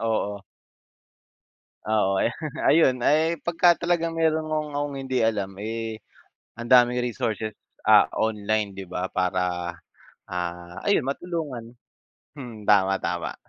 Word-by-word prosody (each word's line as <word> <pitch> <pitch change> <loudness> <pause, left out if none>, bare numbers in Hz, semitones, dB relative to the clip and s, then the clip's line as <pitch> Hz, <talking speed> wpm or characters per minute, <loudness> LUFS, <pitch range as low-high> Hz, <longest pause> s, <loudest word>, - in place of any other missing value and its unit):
oo. 105 -3 -1 1.5
Oo, 95 -3 +2
ay, - - +2 0.3
ayun, 130 -6 +4
ay 160 +4 +2
pagka 175 +1 +4
talagang 170 -1 0
meron 160 -1 +1
kong 155 -1 -2
akong 145 -1 -2
hindi 130 -1 -2
alam, 105 -3 0
eh, 110 +1 -4 0.6
ang 120 0 -8
daming 125 -1 +5
resources, 110 -3 -3 0.3
ah, - - +8
online, 105 -2 -1
'di 95 - -6
ba, 90 +1 -4
para, 90 -1 -1 0.5
ah, 90 0 -5
ayun - - +3
matulungan. 140 -5 -4 0.7
Hmm, 120 -5 -8
tama, 95 -2 +3
tama. - - -2
115 Hz, 120 wpm, -25 LUFS, 100-145 Hz, 1.5 s, ah